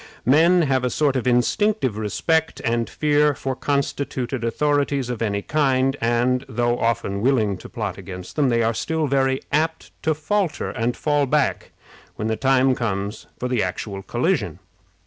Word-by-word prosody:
Men 165 +7 +5
have 135 -3 +1
a 125 - +1
sort 140 +2 +1
of 130 -1 -1
instinctive 130 - +2
respect 160 +10 0
and 115 0 0
fear 150 -1 +2
for 135 0 -3
constituted 135 -3 -2
authorities 140 +1 0
of 120 - -5
any 100 -2 -1
kind, 135 -3 +1
and, 120 +2 +1
though 120 -1 0
often 115 -4 -1
willing 110 -5 +2
to - - -11
plot 105 -6 -4
against 90 -1 -9
them, 140 -4 +2
are 115 -1 +2
still 160 +6 -1
very 135 -1 +1
apt 160 +2 -1
to 155 -1 +1
falter 185 +3 -1
and 120 0 -2
fall 145 -2 +1
back 150 0 0 0.5
when 110 - -3
the 110 - +1
time 130 +1 +3
comes 105 -3 -3
for 125 - -3
the 125 -3 0
actual 95 +2 -4
collision. - - -1
130 Hz, 160 wpm, -22 LUFS, 115-145 Hz, 0.5 s, Men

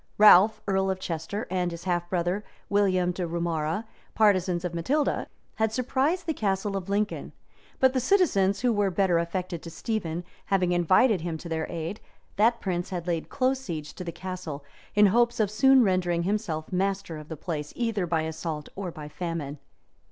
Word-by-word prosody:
Ralph, 210 0 +7
earl 190 -1 +1
of 190 -1 -1
Chester, 175 +5 -4
and 180 -1 0
his 170 0 -8
half 175 -2 -1
brother, 180 +3 0 0.3
William 185 -3 +2
de 180 -1 -3
Roumara, 165 +3 -1 0.3
partisans 185 -4 +3
of 175 - -3
Matilda, 275 - 0 0.3
had 220 -1 +1
surprised 265 +9 0
the 325 - 0
Castle 195 -3 -1
of 195 0 -4
Lincoln; 205 +1 -1 0.5
but 260 -1 +4
the 260 - +2
citizens, 250 - +3
who 245 -1 +3
were 205 -2 +2
better 180 -2 +2
affected 170 0 -3
to 170 - -8
Stephen, 175 -2 -3 0.2
having 185 -3 +1
invited 185 +4 +4
him 165 -1 -3
to 170 - -9
their 160 -1 -2
aid, 170 +4 -5 0.4
that 230 +3 +4
prince 180 -3 -2
laid 175 -2 -2
close 260 0 +1
siege 160 - -6
to 180 - -7
the 170 - -4
castle, 175 -6 -6 0.3
in 210 0 +7
hopes 235 +4 +3
of 210 -2 +2
soon 265 +4 +6
rendering 180 -4 +1
himself 180 -5 -2
master 190 -3 -1
of 150 - -11
the 160 - -6
place, 150 -3 -4
either 225 -6 -1
by 165 -1 +1
assault 160 -1 -4
or 190 -2 -4
by 155 -3 -8
famine. 150 -2 -4
185 Hz, 175 wpm, -27 LUFS, 170-210 Hz, 0.5 s, Ralph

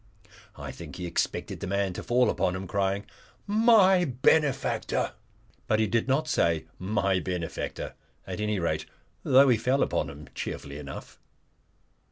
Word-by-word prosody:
I - - -7
think - - -10
he 90 - -5
expected 85 - -2
the - - -4
man 100 0 0
to - - -5
fall 125 +1 +3
upon 90 - 0
him, 95 +1 -5
crying 100 +2 -1 0.4
"My 205 -4 +5
benefactor!" 140 0 +1 0.5
But 110 - +2
he 110 - +3
did 115 +3 0
not 145 +4 +1
say 85 - +1
"My 95 -1 +1
benefactor," 90 -3 -4 0.3
at - - -5
anyrate, 95 -7 -1 0.3
though 135 +2 +6
he 120 - +4
fell 130 +5 +2
upon - - -1
him, 75 0 -10
cheerfully 70 +1 -6
enough. 70 -2 -9
105 Hz, 145 wpm, -27 LUFS, 90-135 Hz, 0.5 s, though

